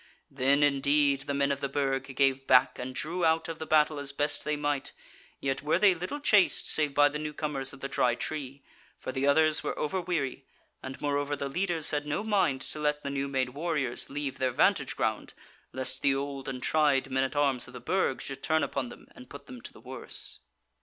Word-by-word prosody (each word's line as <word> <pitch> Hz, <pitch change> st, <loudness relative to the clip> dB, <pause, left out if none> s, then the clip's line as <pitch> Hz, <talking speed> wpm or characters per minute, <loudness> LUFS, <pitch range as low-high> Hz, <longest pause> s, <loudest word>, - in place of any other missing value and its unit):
Then 140 Hz, +2 st, +3 dB
indeed 140 Hz, 0 st, +3 dB
the 140 Hz, -, -1 dB
men 140 Hz, 0 st, +2 dB
of 140 Hz, -, -1 dB
the 140 Hz, -1 st, -2 dB
Burg 135 Hz, -1 st, -1 dB
gave 135 Hz, 0 st, +2 dB
back 125 Hz, -1 st, +5 dB
and 130 Hz, +1 st, -5 dB
drew 170 Hz, +6 st, -3 dB
out 160 Hz, 0 st, +3 dB
of 165 Hz, -1 st, -6 dB
the 160 Hz, -, -5 dB
battle 155 Hz, -1 st, +3 dB
as 140 Hz, -1 st, -3 dB
best 145 Hz, +1 st, 0 dB
they 150 Hz, -, -1 dB
might: 145 Hz, -1 st, -2 dB, 0.5 s
yet 135 Hz, 0 st, -1 dB
were 150 Hz, +3 st, +2 dB
they 195 Hz, 0 st, +5 dB
little 180 Hz, -, -5 dB
chased, 210 Hz, -9 st, +3 dB
save 150 Hz, -2 st, 0 dB
by 145 Hz, 0 st, +6 dB
the 150 Hz, +1 st, -3 dB
new 150 Hz, 0 st, -4 dB
comers 140 Hz, -3 st, -2 dB
of -, -, -12 dB
the 135 Hz, -, -2 dB
Dry 125 Hz, -3 st, +2 dB
Tree, 140 Hz, -1 st, -5 dB, 0.3 s
for -, -, -5 dB
the 135 Hz, +1 st, -1 dB
others 155 Hz, +2 st, +4 dB
were -, -, -3 dB
over 185 Hz, +5 st, -1 dB
weary, 155 Hz, -7 st, -2 dB, 0.4 s
and 130 Hz, 0 st, -7 dB
moreover 145 Hz, 0 st, 0 dB
the 140 Hz, 0 st, -3 dB
leaders 170 Hz, +1 st, 0 dB
had 145 Hz, -1 st, -2 dB
no 150 Hz, +8 st, -1 dB
mind 185 Hz, -11 st, +1 dB
to 150 Hz, -, -5 dB
let 150 Hz, 0 st, 0 dB
the 140 Hz, -, -3 dB
new 140 Hz, 0 st, -1 dB
made 130 Hz, -2 st, 0 dB
warriors 145 Hz, -3 st, -2 dB
leave 140 Hz, -1 st, -4 dB
their 130 Hz, -, +2 dB
vantage 125 Hz, -, +2 dB
ground -, -, -2 dB, 0.4 s
lest 130 Hz, 0 st, -2 dB
the 135 Hz, -1 st, +3 dB
old 135 Hz, -1 st, -4 dB
and 130 Hz, -1 st, -5 dB
tried 140 Hz, -4 st, +2 dB
men 130 Hz, 0 st, +2 dB
at 135 Hz, +3 st, -3 dB
arms 140 Hz, -4 st, +2 dB
of 130 Hz, -, -13 dB
the 125 Hz, -, -7 dB
Burg 160 Hz, +1 st, 0 dB
should 135 Hz, 0 st, -7 dB
turn 160 Hz, +2 st, +2 dB
upon 130 Hz, -3 st, -2 dB
them -, -, -13 dB
and 125 Hz, -, -14 dB
put 140 Hz, -, -10 dB
them 255 Hz, -2 st, -10 dB
to -, -, -8 dB
the -, -, -16 dB
worse. -, -, -8 dB
140 Hz, 220 wpm, -29 LUFS, 135-155 Hz, 0.5 s, by